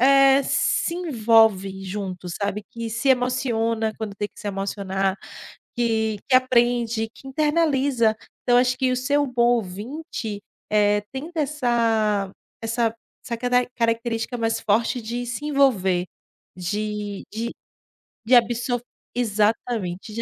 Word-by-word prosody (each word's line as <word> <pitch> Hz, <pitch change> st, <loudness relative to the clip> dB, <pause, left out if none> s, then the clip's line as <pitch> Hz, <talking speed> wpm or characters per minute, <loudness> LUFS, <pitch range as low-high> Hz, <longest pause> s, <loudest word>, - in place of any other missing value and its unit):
eh, 275 Hz, +1 st, +6 dB
se 335 Hz, -, +1 dB
envolve 220 Hz, -, +3 dB
junto, 185 Hz, -2 st, -5 dB
sabe, 200 Hz, +3 st, -3 dB
que 230 Hz, -2 st, -5 dB
se 235 Hz, +5 st, -1 dB
emociona 230 Hz, -3 st, +1 dB
quando 215 Hz, -3 st, -4 dB
tem 205 Hz, 0 st, -2 dB
que -, -, -21 dB
se 210 Hz, -, -4 dB
emocionar, 195 Hz, -1 st, -2 dB, 0.6 s
que 220 Hz, -3 st, 0 dB
que 260 Hz, -, +3 dB
aprende, 240 Hz, -3 st, +2 dB
que 270 Hz, -, -12 dB
internaliza. 280 Hz, -6 st, +2 dB, 0.3 s
Então 245 Hz, -1 st, +3 dB
eu -, -, +7 dB
acho 250 Hz, 0 st, 0 dB
que 260 Hz, -1 st, +2 dB
o -, -, 0 dB
ser 280 Hz, +3 st, +1 dB
o 290 Hz, -, +2 dB
bom 245 Hz, -1 st, +3 dB
ouvinte, 215 Hz, -, -5 dB, 0.3 s
eh, 205 Hz, 0 st, +3 dB
tendo 285 Hz, +6 st, -5 dB
essa 230 Hz, -8 st, +1 dB, 0.3 s
essa 230 Hz, 0 st, 0 dB, 0.3 s
essa 235 Hz, -2 st, -3 dB
cara 245 Hz, +1 st, +1 dB
característica 230 Hz, 0 st, -1 dB
mais 225 Hz, 0 st, 0 dB
forte 230 Hz, +3 st, +1 dB
de 240 Hz, +2 st, -4 dB
se 240 Hz, +5 st, -5 dB
envolver, 195 Hz, -11 st, +2 dB, 0.5 s
de 210 Hz, +2 st, -3 dB
de 230 Hz, +2 st, -3 dB, 0.7 s
de 250 Hz, +3 st, +5 dB
abso 240 Hz, +1 st, +2 dB, 0.3 s
Exatamente, 215 Hz, -3 st, -1 dB
de 230 Hz, -, -3 dB
230 Hz, 135 wpm, -23 LUFS, 210-250 Hz, 0.7 s, eu